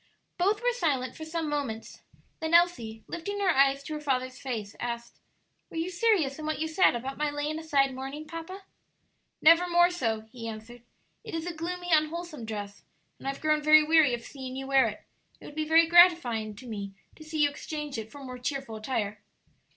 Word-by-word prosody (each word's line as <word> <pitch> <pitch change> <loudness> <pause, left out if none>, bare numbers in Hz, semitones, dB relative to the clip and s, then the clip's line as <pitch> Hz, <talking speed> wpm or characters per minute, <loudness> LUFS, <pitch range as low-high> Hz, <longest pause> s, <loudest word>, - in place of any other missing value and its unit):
Both 405 +5 +2
were - - +2
silent 285 - -1
for 315 - -7
some 320 0 -3
moments; 280 -7 -4 0.4
then 320 +1 +1
Elsie, 235 -11 +2
lifting 405 +4 -5
her 390 -2 +3
eyes 275 -1 +3
to 310 - -6
her 300 - -4
father's 255 -2 -1
face, 225 -6 -5
asked, 235 -1 -5 0.5
"Were - - -8
you 335 +3 -2
serious 350 -8 +2
in 310 - -5
what 310 - -1
you 320 - -1
said 320 -3 +4
about 265 +4 -5
my 300 0 +1
laying 295 +2 -3
aside 280 -4 +2
mourning, 270 +4 -6
papa?" 330 +5 -8 0.8
"Never 335 +3 +6
more 345 +1 +5
so," 225 -11 -1
he 235 -2 -7
answered. 225 +2 -8 0.4
"It - - -6
is 325 0 -3
a 355 - -3
gloomy, 355 +2 -5
unwholesome 310 -3 0
dress, 205 -2 -6 0.4
and - - -8
I - - +1
have 275 - -11
grown 305 -1 +2
very 305 +1 +7
weary 305 -5 +4
of 235 - -10
seeing 260 -1 -8
you 270 0 -5
wear 270 -1 +4
it. - - -7 0.4
It - - -14
would - - -10
be 310 0 -2
very 325 +1 +6
gratifying 325 - +5
to 250 +5 -12
me 200 -3 -5 0.2
to 310 - -12
see 310 -1 0
you 290 - +4
exchange 295 -3 -5
it 220 0 -8
for 285 -1 -10
more 255 -1 -7
cheerful 260 -3 -4
attire." 215 -3 -3
295 Hz, 205 wpm, -28 LUFS, 250-330 Hz, 0.8 s, very